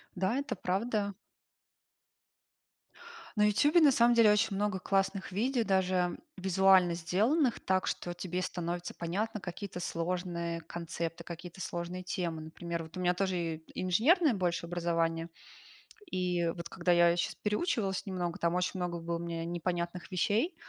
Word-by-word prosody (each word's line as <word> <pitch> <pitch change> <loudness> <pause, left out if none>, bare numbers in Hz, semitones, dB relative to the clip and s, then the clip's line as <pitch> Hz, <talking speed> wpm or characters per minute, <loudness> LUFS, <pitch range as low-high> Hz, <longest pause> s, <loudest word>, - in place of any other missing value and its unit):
Да, 190 +5 0
это 285 +1 -2
правда. 200 +2 -1 2.2
На 210 - +4
"Ютубе" 290 - +4
на 295 -3 +7
самом 240 -1 +4
деле 225 -3 +7
очень 210 -1 +2
много 205 -1 0
классных 195 +1 0
видео, 240 +5 +1
даже 185 -3 +1 0.2
визуально 190 -1 +4
сделанных 225 - +2
так, 185 0 +1
что 175 0 -3
тебе 180 0 -3
становится 175 -1 -3
понятно 210 +6 -2
какие-то 185 0 -6
сложные 170 -1 -2
концепты, 170 0 -5
какие-то 175 +2 -8
сложные 175 +1 -4
темы. 175 -3 -3
Например, 170 +2 -5
вот 165 +2 -10
у - - -3
меня 180 0 +2
тоже 190 0 0 0.2
и 160 - -21 0.2
инженерное 270 - +4
больше 180 -3 -1
образование. 165 -1 -1 0.8
И 180 -2 0
вот 170 -1 -7
когда 180 -1 0
я 170 0 +5
щас 175 - 0
переучивалась 210 - -1
немного, 180 -3 -3
там 170 0 +1
очень 180 +1 -1
много 175 -1 -2
было 170 0 -2
мне 170 -1 -4
непонятных 175 +1 -3
вещей, 215 - +1
180 Hz, 140 wpm, -31 LUFS, 170-200 Hz, 2.2 s, на